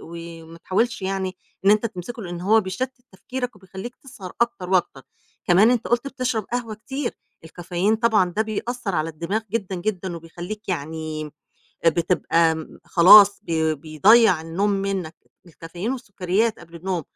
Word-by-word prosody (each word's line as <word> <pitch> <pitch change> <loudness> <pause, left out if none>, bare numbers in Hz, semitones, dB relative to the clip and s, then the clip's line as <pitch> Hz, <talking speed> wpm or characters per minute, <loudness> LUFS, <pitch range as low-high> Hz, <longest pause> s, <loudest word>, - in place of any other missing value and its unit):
وما 165 0 -10
تحاولش 230 +6 -1
يعني 190 -1 -2 0.3
إن 200 - +6
أنت 215 +2 +3
تمسكه، 225 +3 -7
لإن 175 -1 -6
هو 215 +5 +4
بيشتِّت 230 +7 -3 0.2
تفكيرك 250 +4 -5
وبيخلّيك 195 +5 -9
تسهر 215 -9 -11
أكتر 235 -6 -1
وأكتر. 175 -7 +1 0.4
كمان 195 +6 +5
أنت 245 -2 0
قُلت 240 +3 +1
بتشرب 255 -5 -2
قهوة 240 -3 -2
كتير، 265 +4 -5 0.3
الcaffeine 175 +5 -1
طبعًا 215 -6 +3
ده 220 - +3
بيأثّر 220 -1 -3
على 155 0 0
الدماغ 170 +7 -2
جدًا، 200 -3 -2
جدًا 185 -1 -3
وبيخلّيك 175 +6 -8
يعني 155 -2 -4 0.5
آآ - - +7
بتبقى 165 -1 +2
م 160 -1 -9
خلاص 200 +3 +8
بي 160 -1 0
بيضيّع 160 +8 +4
النوم 170 +6 -1
منّك، 195 -4 -2 0.3
الcaffeine 175 +6 -6
والسُكّريات 210 -2 -1
قبل 170 0 -15
النوم 180 0 -3
190 Hz, 145 wpm, -23 LUFS, 170-220 Hz, 0.5 s, خلاص